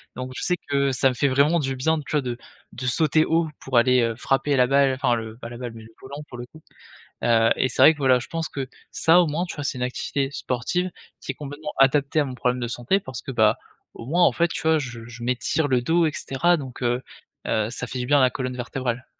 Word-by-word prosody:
donc 130 +1 -5
je - - -4
sais 180 - +2
que 140 -1 +2
ça 130 +1 +3
me - - -2
fait 140 - +2
vraiment 140 +5 +3
du 135 -3 -2
bien, 160 +5 +1
tu 145 - -9
vois, 150 -2 +2
de 125 -2 -4 0.3
de 125 - -7
sauter 155 +4 +3
haut 165 0 +1
pour 130 -2 -1
aller, 125 +1 +4
heu, 115 -1 0
frapper 135 +4 0
la 125 -1 +4
balle. 135 0 +3
Enfin 125 -2 +1
le 110 -1 -6
pas 115 -1 -8
la 120 - -8
balle 120 -1 -6
mais 115 - -11
le 110 - -14
volant 140 +3 -8
pour 120 - -9
le 120 - -6
coup, 155 +6 -17 0.6
heu, 115 -1 +4
et 130 - +1
c'est - - 0
vrai 160 - +9
que, 155 - -12
voilà, 130 -3 +4
je 125 - -8
pense 165 -1 -3
que 135 -2 -5 0.2
ça, 165 +2 +4
au 175 - +3
moins 155 +3 -1
tu - - -7
vois, 145 - -4
c'est 140 - -2
une 125 - -1
activité 135 +2 -2
sportive 145 +10 -2 0.3
qui - - -4
est - - -19
complètement 150 +1 -7
adaptée 140 +2 +3
à - - +2
mon 130 -2 -6
problème 125 0 0
de 120 - -2
santé. 120 +11 0
Parce 130 -10 -8
que - - -7
bah, 110 -3 +3 0.4
au 115 - -10
moins 175 +6 +3
en - - +4
fait 170 0 +1
tu - - -5
vois, 160 0 +3
je 120 -5 -6
je 120 0 -11
m'étire 125 +5 0
le 125 -2 +2
dos 165 +5 +2
et 155 - -1
cetera, 170 +6 +1
donc 135 -5 -8
heu 120 +1 0 0.4
heu, 110 -1 0
ça 125 - -4
fait 130 - -6
du 125 - -3
bien 145 +2 +4
à - - +4
la 130 - +4
colonne 125 0 -4
vertébrale. 125 0 -4
130 Hz, 270 wpm, -24 LUFS, 125-150 Hz, 0.6 s, vrai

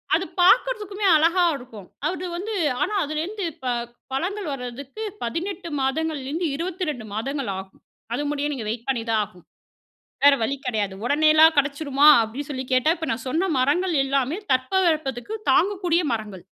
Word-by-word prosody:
அது 360 +4 0 0.2
பார்க்கறதுக்குமே 420 0 +3
அழகா 335 +3 +4
இருக்கும். 230 -8 -11 0.2
அது 370 0 -4
வந்து, 420 +5 -4 0.3
ஆனா - - 0
அதிலேருந்து 335 +7 -3
இப்ப 260 -6 -4 0.4
பழங்கள் 365 +4 -2
வர்றதுக்கு 270 - -6 0.2
18 340 +9 -4
மாதங்கள்லேருந்து 305 +3 -1
22 330 - -3
மாதங்கள் 270 +2 -3
ஆகும். 190 0 -12 0.3
அது 290 - -2
முடியே 295 0 -1
நீங்க 240 -5 -5
வெயிட் 230 +1 -5
பண்ணிதான் 230 -4 +1
ஆகுனும். 190 -4 -14 0.8
வேற 285 -1 +8
வழி 250 +5 0
கெடையாது. 210 -5 -1
"உடனேலாம் 310 +4 +5
கெடைச்சிருமா?" 285 0 +2
அப்டின்னு 240 +6 -4
சொல்லி 260 -2 -3
கேட்டா, 255 +4 +3
இப்ப 320 0 -5
நான் 225 +2 -3
சொன்ன 335 +8 0
மரங்கள் 335 +8 +2
எல்லாமே 275 +2 0 0.2
தட்பவெப்பத்துக்கு 305 - 0 0.2
தாங்கக்கூடிய 365 -3 +2
மரங்கள். 210 -5 -4
290 Hz, 140 wpm, -23 LUFS, 250-350 Hz, 0.8 s, வேற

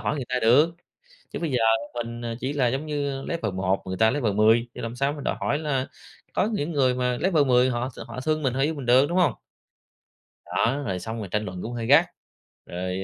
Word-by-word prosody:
hỏi - - -1
người 135 - -3
ta 125 - -1
được. 145 +9 +5 0.6
Chứ - - -4
bây 165 -3 -2
giờ 125 - +2 0.4
mình, 120 0 -5
ờ, 115 -1 -4
chỉ 135 +3 -2
là 135 -4 +2
giống 135 +5 -2
như, 145 -2 -2
ờ, - - -8
level 115 -12 -2
1, 95 +1 0
người 95 0 -4
ta 110 0 +4
level 120 -8 0
10, 110 +3 +4
thì - - -6
làm 115 +1 -5
sao 140 +3 0
mình 145 -2 -8
đòi - - -1
hỏi 145 - 0
là 135 -4 -1 0.5
có 210 - +1
những 165 -4 -2
người 130 -4 +2
mà 125 -1 0
level 165 -3 +2
10 125 -1 +4
họ 125 +1 -2
s - - -11
họ 115 +2 -7
thương 155 +1 -1
mình, 130 - +1
họ 135 - -3
yêu 155 +3 +1
mình 140 -4 -7
được, 130 +3 +5
đúng 175 - -1
hông? 165 -10 +3 1.1
Đó, 135 +5 0
rồi 95 -3 -2
xong 110 +5 -5
rồi 105 - -5
tranh 105 0 -1
luận 90 -1 -6
cũng 120 - -5
hơi 115 -1 -4
gắt. - - +6 0.6
Rồi, 90 +2 -4
125 Hz, 250 wpm, -25 LUFS, 115-145 Hz, 1.1 s, gắt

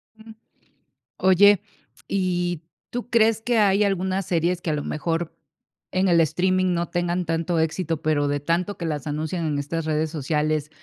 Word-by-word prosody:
Mm. 220 0 -14 0.9
Oye. 190 +1 +5 0.5
¿Y, 175 -3 -1 0.3
tú 245 0 -5
crees 225 -2 +3
que 235 +1 0
hay 205 -1 +4
algunas 190 -1 0
series 175 +1 0
que, 170 - -3
a - - +1
lo 145 -1 -2
mejor, 165 +1 -3 0.6
en 185 +1 +1
el 170 -2 +4
streaming 185 +4 +1
no 170 0 -2
tengan 175 0 -1
tanto 165 +1 -1
éxito, 160 0 -1
pero 150 -2 +1
de 145 0 0
tanto 170 +7 -1
que 170 - -5
las 150 -2 -3
anuncian 155 +3 -2
en 150 -2 -1
estas 160 +3 -3
redes 155 0 0
sociales, 150 0 -1
170 Hz, 165 wpm, -24 LUFS, 155-185 Hz, 0.9 s, Oye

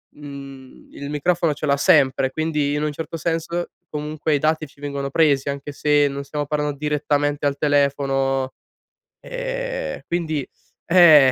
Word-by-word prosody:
mhmm, 140 -2 -11
il 140 0 -7
microfono 165 +2 +1
ce 150 - -4
l'ha 140 -1 +2
sempre, 140 -5 +4
quindi, 150 -1 0
in 150 - -1
un 150 - 0
certo 160 +2 -5
senso, 170 +1 -2 0.2
comunque 150 +1 -1
i - - +1
dati 155 +1 +1
ci 140 - -23
vengono 140 -1 -3
presi, 140 -2 +2
anche 140 +1 -4
se 145 0 +3
non 140 0 -5
stiamo 145 +1 -3
parlando 150 0 -2
direttamente 145 0 0
al 140 0 -1
telefono, 135 -2 +1 0.7
ehm, - - -4
quindi, 160 -5 -1 0.4
eh, 160 -6 +8
145 Hz, 150 wpm, -22 LUFS, 140-155 Hz, 0.7 s, eh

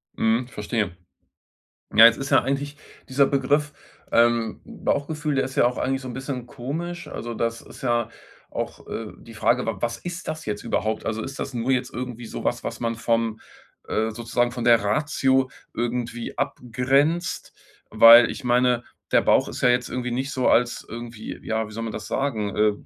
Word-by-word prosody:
Mhm 115 +2 +1
verstehe. 105 -5 -2 1.0
Ja, 110 - +10
jetzt 115 0 +4
ist 135 0 -4
ja - - +5
eigentlich 140 +2 -2 0.3
dieser 140 +1 +4
Begriff, 145 +2 +1 0.4
ähm, 115 -1 +2
Bauchgefühl 150 0 -2
der 135 - +2
ist 130 0 -6
ja - - +5
auch 125 - -1
eigentlich 135 0 0
so 130 - -7
´n - - -5
bisschen 130 -1 -5
komisch. 155 +8 -5
Also, 120 0 -5
das 115 0 -2
ist - - -14
ja 120 -3 +1 0.4
auch - - -5
äh, 110 -1 -5
die 115 - -13
Frage, 120 +3 +2
wa 115 -2 -1
was 115 +2 -2
ist 175 +1 -7
das 155 0 -4
jetzt 105 -1 -4
überhaupt? 110 +1 -1
Also, 110 0 -2
ist 135 +3 -7
das 135 - -4
nur 120 +2 -1
jetzt 125 -1 0
irgendwie 120 -1 -5
so - - -6
was, - - -1
was - - -5
man 115 -1 -1
vom 115 -1 0 0.5
äh, 110 +1 0
sozusagen 120 +2 -1
von 120 -1 -4
der 115 -3 +5
Ratio 130 +3 +1 0.2
irgendwie 120 0 -3
abgrenzt? 135 +8 0 0.4
Weil 115 +2 +9
ich - - -7
meine, 125 -1 +2 0.3
der - - +6
Bauch - - +3
ist - - -6
ja 125 - +5
jetzt 125 0 +2
irgendwie 125 -1 -3
nicht 130 +3 -2
so 130 -2 +1
als 120 +1 +2
irgendwie 115 -1 -7
ja, 110 -1 -1
wie - - -12
soll 115 +2 -4
man 115 - -4
das 110 - -6
sagen, 110 -8 -1
äh, 105 0 +4
120 Hz, 190 wpm, -24 LUFS, 115-135 Hz, 1.0 s, Ja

